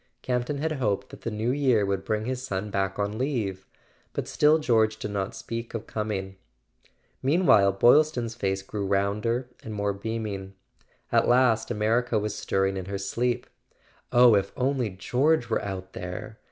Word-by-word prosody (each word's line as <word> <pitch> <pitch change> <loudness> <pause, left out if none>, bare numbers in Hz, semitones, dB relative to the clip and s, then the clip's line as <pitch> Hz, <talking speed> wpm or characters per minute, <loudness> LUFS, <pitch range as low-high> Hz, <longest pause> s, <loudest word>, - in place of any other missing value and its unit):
Camp 125 -1 0
ton 145 - -2
had 160 +3 -1
hoped 105 -9 -1
that - - -12
the - - -3
New 110 +2 -1
Year 130 -7 +2
would 100 -1 -1
bring 110 +1 -1
his 130 0 -3
son 105 -4 -4
back 95 -1 -1
on 105 +2 -2
leave; 110 -9 -2 0.5
but - - -3
still 150 +1 +4
George 110 -7 +2
did 105 - -5
not 100 -1 -3
speak 115 0 -6
of 115 - -4
com¬ 110 0 -3
ing. 95 -1 -4 0.8
Meanwhile 130 - +4
Boylston's 120 +2 +4
face 95 -4 -2
grew 100 0 -4
rounder 105 +5 0
and 110 -1 -7
more 100 0 0
beaming. 100 -2 -5 0.6
At - - +3
last 120 -3 +3
America 115 +1 +1
was 105 0 -2
stirring 95 -1 0
in 95 - -4
her 100 +1 -4
sleep. 120 +5 -1 0.7
"Oh, 120 -1 +7
if 100 -1 +2
only 130 -3 0
George 125 +8 +1
were - - +1
out 95 -1 -6
there!" 90 +1 -7
110 Hz, 170 wpm, -26 LUFS, 100-125 Hz, 0.8 s, Oh